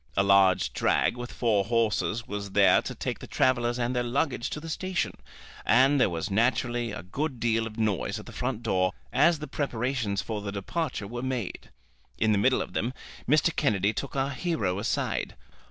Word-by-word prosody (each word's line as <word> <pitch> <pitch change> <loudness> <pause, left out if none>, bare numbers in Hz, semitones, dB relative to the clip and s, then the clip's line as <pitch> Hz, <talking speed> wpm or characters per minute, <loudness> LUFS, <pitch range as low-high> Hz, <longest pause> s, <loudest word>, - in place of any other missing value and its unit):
A 100 - +5
large 100 -2 +4
drag - - +2
with 120 0 -6
four 110 -5 +1
horses 115 0 0
was 100 -1 -5
there 100 -1 +5
to - - -6
take - - -3
the - - -9
travellers 120 -2 +1
and 125 +1 -1
their 125 - +2
luggage 125 +1 -1
to - - -4
the 165 - -9
station, 185 +3 -2 0.5
and 135 +4 +4
there - - +4
was 85 +2 -3
naturally 120 +2 +1
a 110 - -6
good 135 - -3
deal 115 -1 +1
of 110 0 -10
noise 110 -5 0
at - - -10
the - - -10
front 125 -2 -3
door 95 -4 +1 0.2
as 170 -1 +4
the 150 0 -7
preparations 125 -6 -1
for 105 -1 -3
the 100 -1 -4
departure 110 - -3
were 120 +4 -5
made. 125 -7 -4 0.5
In 110 0 +2
the 105 - +3
middle 130 +5 +3
of - - -12
them 125 +3 -2 0.3
Mr. 155 +3 +3
Kennedy 105 -7 +2
took 140 +6 -5
our 135 +1 0
hero 120 - -1
aside. - - -1
120 Hz, 190 wpm, -27 LUFS, 105-130 Hz, 0.5 s, A